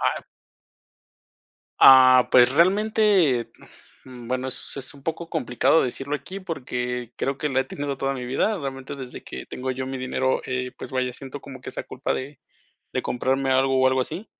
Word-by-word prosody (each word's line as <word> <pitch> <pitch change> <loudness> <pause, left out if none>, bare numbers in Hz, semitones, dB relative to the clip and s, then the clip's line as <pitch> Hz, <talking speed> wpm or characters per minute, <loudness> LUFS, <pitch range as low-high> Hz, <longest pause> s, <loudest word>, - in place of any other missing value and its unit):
Ah. - - 0 1.6
Ah, 130 -1 +8
pues, 125 0 +6
realmente, 185 - +3 0.5
mm, 125 -2 -11
bueno, 130 +1 -2
es 130 - -5
es 130 +1 -6
un 140 - -16
poco 165 +2 -4
complicado 140 -1 +2
decirlo 135 +3 -3
aquí 165 +7 -6
porque, 125 - -4
creo 135 0 -2
que 150 - -1
la 130 -1 +1
he - - -1
tenido 140 +1 -4
toda 135 +1 -1
mi 125 -2 -5
vida. 195 - 0
Realmente 135 -2 -6
desde 130 -2 -8
que 65 - -8
tengo 130 +1 -4
yo 130 +1 -4
mi 135 0 -4
dinero, 130 0 -1
eh, 125 -1 -3
pues - - -8
vaya, 130 -1 -1
siento 135 +1 -8
como 130 -2 -11
que - - -7
esa - - -5
culpa 130 - -3
de 140 +3 -5 0.6
de - - 0
comprarme 135 +2 -1
algo, 130 0 +3
o 130 - +4
algo 130 0 +2
así. 165 - -4
130 Hz, 185 wpm, -24 LUFS, 130-145 Hz, 1.6 s, Ah